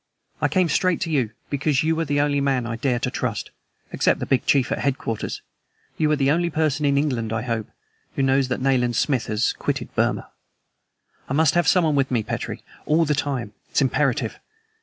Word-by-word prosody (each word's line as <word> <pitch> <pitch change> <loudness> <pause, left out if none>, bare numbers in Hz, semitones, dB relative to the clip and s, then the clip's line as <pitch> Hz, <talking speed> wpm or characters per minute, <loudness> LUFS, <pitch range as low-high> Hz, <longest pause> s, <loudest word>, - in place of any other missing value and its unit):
"I - - +3
came 185 -2 +2
straight 185 +3 +1
to 165 - -2
you, 130 -7 +1 0.2
because 145 +1 +1
you 160 +1 +1
are 165 - 0
the 145 0 +1
only 145 -1 +1
man 135 -3 +1
I 115 0 -3
dare 125 +1 0
to 125 +1 -2
trust. 115 -7 -3 0.4
Except - - +2
the - - -2
big 130 - 0
chief 135 -1 +3
at - - -1
headquarters, 130 -5 -2 0.5
you 155 -1 +1
are - - +4
the 140 -1 +2
only 170 +2 +1
person 155 -2 0
in 140 0 +2
England, 125 -7 0
I 110 0 -1
hope, 115 -3 -2 0.5
who 135 - 0
knows 135 0 +3
that 125 0 -2
Nayland 125 -3 +2
Smith 130 0 +1
has 105 +1 +1
quitted - - -3
Burma. - - 0 1.0
I - - -1
must 155 +1 +4
have 175 0 +2
someone 165 -5 +4
with 135 -2 +1
me, 120 -4 0
Petrie, - - -5 0.2
all 160 +2 +3
the 150 - +1
time 130 -7 -2 0.2
it's - - +2
imperative! 135 -3 0
140 Hz, 200 wpm, -23 LUFS, 125-150 Hz, 1.0 s, are